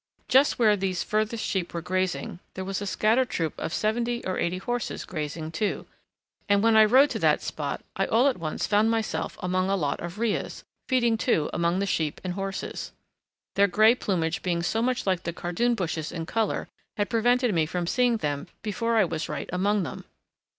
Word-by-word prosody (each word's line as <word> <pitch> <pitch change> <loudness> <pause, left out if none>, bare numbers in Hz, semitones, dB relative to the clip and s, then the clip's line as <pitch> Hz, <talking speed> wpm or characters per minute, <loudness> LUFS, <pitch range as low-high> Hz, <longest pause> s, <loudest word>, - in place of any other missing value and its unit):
Just 270 +3 +4
where 215 -3 +5
these 190 -2 -1
furthest 215 +1 -1
sheep 180 -3 -2
were 170 - -2
grazing 185 -1 -2 0.2
there 190 - -4
was 195 +1 -3
a 205 - -3
scattered 230 +6 +2
troop 160 -3 -1
of - - -3
seventy 235 +5 -1
or 185 - -2
eighty 175 +2 0
horses 240 +6 -3
grazing 155 -1 -4
too, 200 +5 -2 0.6
and 200 0 +4
when 225 -1 +4
I 220 0 +8
rode 260 +6 +5
to - - -2
that - - +3
spot - - -4
I - - 0
all 240 +5 +4
at 260 -8 0
once 155 -2 -2
found 210 +2 +3
myself 225 -1 -2
among 185 +1 0
a 195 - +2
lot 145 -7 -1
of 175 +3 -6
rheas, 225 -1 -2 0.2
feeding 240 -4 +2
too 160 - +1
among 170 +1 +1
the 200 - 0
sheep 160 -6 -1
and 180 -1 -2
horses. 195 +1 -5 0.6
Their 200 +1 +4
grey 215 +4 +5
plumage 175 -8 -1
being 170 -2 -1
so 220 +6 0
much 250 +1 0
like 185 -3 +1
the 170 - -4
cardoon 180 +9 0
bushes 165 -5 -3
in 165 -2 -4
colour 220 +4 -1 0.3
had 205 -1 +1
prevented 245 0 +3
me 160 -3 +2
from 175 +2 -2
seeing 245 +5 +2
them 145 -7 -3 0.2
before 230 +2 0
I 215 - +5
was 160 -2 -3
right 150 -2 -5
among 200 +2 +1
them. - - -7
195 Hz, 200 wpm, -26 LUFS, 175-225 Hz, 0.6 s, I